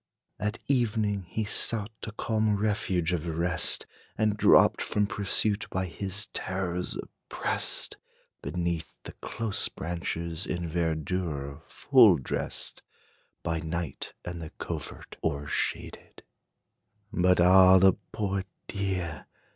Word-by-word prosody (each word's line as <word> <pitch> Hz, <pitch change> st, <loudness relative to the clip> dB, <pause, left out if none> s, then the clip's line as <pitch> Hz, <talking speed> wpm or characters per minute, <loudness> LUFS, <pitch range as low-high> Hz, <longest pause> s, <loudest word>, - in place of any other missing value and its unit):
At 105 Hz, +3 st, -1 dB
evening, 110 Hz, -7 st, +1 dB
he 110 Hz, -, -1 dB
sought 105 Hz, +1 st, -1 dB, 0.2 s
a -, -, -4 dB
calm 110 Hz, 0 st, +1 dB
refuge 95 Hz, -5 st, 0 dB
of 85 Hz, -1 st, -2 dB
rest, 85 Hz, 0 st, 0 dB, 0.3 s
And 105 Hz, -1 st, +2 dB
dropped -, -, +6 dB
from 105 Hz, -1 st, +1 dB
pursuit, 100 Hz, +1 st, 0 dB
by 95 Hz, 0 st, -1 dB
his 95 Hz, +3 st, -2 dB
terrors 90 Hz, -1 st, -2 dB
oppressed, -, -, -4 dB, 0.4 s
Beneath 85 Hz, -2 st, -3 dB
the -, -, -7 dB
close 110 Hz, -3 st, -1 dB
branches, 85 Hz, 0 st, -3 dB
in 85 Hz, -1 st, -2 dB
verdure 80 Hz, -3 st, -2 dB
full 125 Hz, -9 st, +6 dB
dressed, 65 Hz, -, -4 dB, 0.6 s
By 80 Hz, -1 st, -1 dB
night 80 Hz, -1 st, -4 dB
and 85 Hz, -1 st, -5 dB
the 80 Hz, -, -6 dB
covert -, -, -6 dB
o'ershaded. 75 Hz, -2 st, -3 dB, 0.9 s
But 90 Hz, 0 st, +4 dB
ah, 95 Hz, +1 st, +8 dB
the 95 Hz, 0 st, +6 dB, 0.2 s
poor 100 Hz, -2 st, -1 dB, 0.2 s
deer! 95 Hz, -6 st, -3 dB
90 Hz, 110 wpm, -28 LUFS, 85-105 Hz, 0.9 s, ah